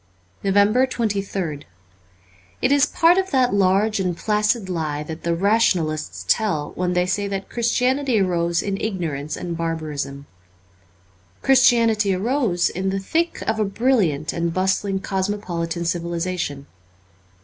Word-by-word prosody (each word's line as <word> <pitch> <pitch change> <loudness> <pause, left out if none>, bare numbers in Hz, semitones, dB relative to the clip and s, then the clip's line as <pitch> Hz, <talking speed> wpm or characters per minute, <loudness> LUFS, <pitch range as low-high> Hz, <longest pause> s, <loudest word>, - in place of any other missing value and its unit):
362 210 +7 +2
NOVEMBER 220 -3 +1
23rd 170 -7 -4 1.0
IT 255 - +3
is 285 0 +4
part 340 +4 +4
of 380 0 -2
that 255 - +2
large 200 +2 +2
and 180 -3 -1
placid 210 +1 0
lie 155 -5 -2
that 160 +2 -7
the 170 0 0
rationalists 175 -6 +1
tell 175 -10 0
when 180 0 -2
they 180 0 +2
say 200 +2 -1
that 195 -1 -5
Chris 235 -1 0
tianity 260 -2 +1
arose 170 -3 0
in 200 -1 -3
ignorance 160 -8 -3
and 175 -1 -4
barbarism. 155 -4 -4 1.2
Christianity 230 -6 +4
arose 215 -3 +1
in 190 +2 -2
the 195 - -1
thick 330 - -1
of 220 0 -1
a - - +3
brilliant 195 - +1
and 170 0 -1
bustling 190 +2 0
cosmopolitan 185 -4 -2
civilization. 170 -4 -3
190 Hz, 135 wpm, -22 LUFS, 170-220 Hz, 1.2 s, is